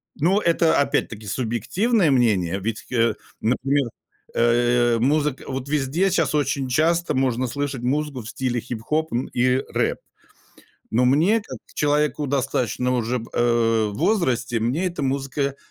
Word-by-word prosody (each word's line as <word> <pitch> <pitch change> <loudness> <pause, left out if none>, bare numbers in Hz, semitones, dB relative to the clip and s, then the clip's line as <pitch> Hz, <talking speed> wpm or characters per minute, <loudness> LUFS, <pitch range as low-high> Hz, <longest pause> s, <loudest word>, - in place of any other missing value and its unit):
Ну, 180 +7 +2
это, 170 -3 +2
опять-таки, 110 -6 -1
субъективное 145 - +1
мнение. 100 -8 +2
Ведь, 110 +3 -4
э, 115 -2 +2 0.3
например, 135 +3 +1 0.4
э, 120 0 +3
музыка 145 +2 +1
вот 135 0 -5
везде 150 +6 +1
щас 165 -5 +1
очень 140 -2 0
часто 160 +5 +1
можно 130 -1 +1
слышать 140 0 -3
музыку 140 +1 -1
в 110 - -9
стиле 125 -1 -2
хип-хоп, 125 +7 -3
м, 120 +2 -1
и 125 +1 +1 0.2
рэп. - - +1 0.9
Но 125 +3 +3
мне, 165 - +3
как 205 - -9 0.2
человеку 150 0 +1
достаточно 130 -2 0
уже, 120 +1 -1
в, 115 - -10
э, 115 -2 +2
возрасте, 125 - 0
мне 130 +12 0
эта 175 - -5
музыка 135 +1 -1
130 Hz, 140 wpm, -23 LUFS, 120-150 Hz, 0.9 s, э